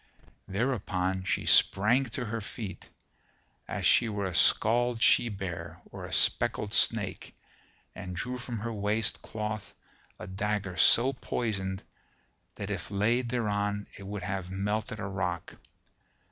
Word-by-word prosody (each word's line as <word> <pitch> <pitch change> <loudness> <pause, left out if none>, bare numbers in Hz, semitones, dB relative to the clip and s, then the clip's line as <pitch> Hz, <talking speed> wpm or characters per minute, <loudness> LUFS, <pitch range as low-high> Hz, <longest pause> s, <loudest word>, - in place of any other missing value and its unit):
Thereupon 95 -4 -1
she - - 0
sprang 120 +8 +4
to 125 +1 -4
her 115 +1 -3
feet, 100 0 -7 0.8
as - - -3
she 120 - +5
were 100 -2 -2
a 95 - -3
scald 120 +6 +3
she 115 +1 +5
bear 85 -4 -6
or - - -7
a - - -11
speckled 105 0 +2
snake, 105 -6 +2 0.6
and 90 -2 -7
drew 125 +7 -4
from 120 -1 -5
her 115 +2 -4
waist 105 +1 0
cloth 110 -1 -5 0.4
a - - -8
dagger 100 0 -2
so 125 +8 +6
poisoned 100 -6 -3 0.7
that - - -5
if - - -4
laid 115 +5 +1
thereon 105 -3 -1
it 100 - -10
would 105 0 -5
have 95 -2 -3
melted 105 +3 -2
a - - -3
rock. 90 -4 -3
105 Hz, 135 wpm, -29 LUFS, 95-115 Hz, 0.8 s, so